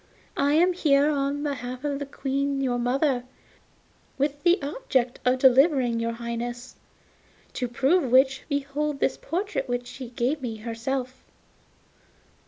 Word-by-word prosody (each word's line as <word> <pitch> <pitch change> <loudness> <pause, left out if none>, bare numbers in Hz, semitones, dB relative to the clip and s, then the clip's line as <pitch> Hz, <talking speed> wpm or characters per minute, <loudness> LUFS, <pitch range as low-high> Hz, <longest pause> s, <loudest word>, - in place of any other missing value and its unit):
I 285 +1 +2
am 355 +3 +4
here 295 -3 +3
on 285 0 -1
behalf 255 -2 -4
of 285 -1 -2
the 285 - -5
Queen 275 0 -2
your 250 -3 0
mother, 255 +1 +1 0.9
with 285 +1 -1
the 350 +2 +4
object 270 - -1
of 250 +1 +3
delivering 260 -2 +4
your 230 0 -1
Highness; 240 +1 -5 0.8
to 250 - -2
prove 270 +4 +1
which, 265 +1 +4
behold 285 0 -2
this - - +1
portrait 350 -3 -3
which 245 0 -2
she 250 0 -8
gave 250 +5 -1
me 235 -4 -4
herself. 245 +4 -4
270 Hz, 135 wpm, -26 LUFS, 245-285 Hz, 0.9 s, am